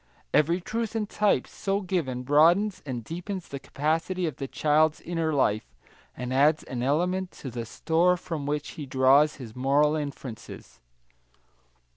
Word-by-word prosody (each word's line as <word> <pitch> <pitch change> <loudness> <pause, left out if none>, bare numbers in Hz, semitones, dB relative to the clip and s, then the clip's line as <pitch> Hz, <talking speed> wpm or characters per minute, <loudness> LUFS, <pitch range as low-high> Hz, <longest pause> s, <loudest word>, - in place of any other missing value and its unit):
Every 170 +4 +3
truth 225 +4 -3
and 215 -2 -1
type 205 -11 +1
so 200 +1 -2
given 160 -10 -2
broadens 170 +9 +4
and 120 -3 -4
deepens 180 - -6
the 140 - -6
capacity 165 +7 -1
of 155 -6 -3
the 135 - -4
child's 155 +2 +2
inner 165 -2 -2
life, 110 -7 0 0.4
and 125 +1 -4
adds 150 +4 +3
an 125 -2 -5
element 180 +8 0
to 130 - -8
the 115 -1 -5
store 175 +8 +2
from 160 -5 -5
which 150 0 -2
he 150 -3 -8
draws 135 +3 +4
his 120 -5 -10
moral 140 +4 +3
inferences. 130 - -7
150 Hz, 150 wpm, -27 LUFS, 135-175 Hz, 0.4 s, broadens